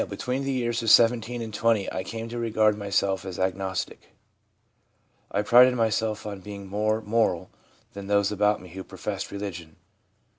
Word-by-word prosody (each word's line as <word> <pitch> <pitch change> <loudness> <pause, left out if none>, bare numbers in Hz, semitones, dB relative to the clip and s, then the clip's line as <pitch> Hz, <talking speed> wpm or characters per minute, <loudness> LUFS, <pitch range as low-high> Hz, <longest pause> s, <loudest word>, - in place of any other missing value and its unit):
'Between 130 +2 -3
the 135 - -1
years 120 -3 -1
of 115 - 0
17 120 +1 +4
and 110 -1 -7
20 115 -2 +1
I 95 - -3
came 115 0 -6
to 120 +1 -5
regard 110 -2 +2
myself 100 -1 0
as 95 -2 -6
an - - 0
agnostic. 95 0 -3 1.2
I 100 - 0
prided 125 +3 +6
myself 110 -2 0
on 100 -2 -5
being 100 0 -8
more 105 +3 0
moral 105 -5 0 0.4
than 100 -1 -8
those 100 0 +2
about 105 0 +2
me 90 - -13
who 95 +3 -8
professed 100 0 -5
religion/ 100 -5 -6
M. 80 - -26
105 Hz, 175 wpm, -26 LUFS, 95-115 Hz, 1.2 s, prided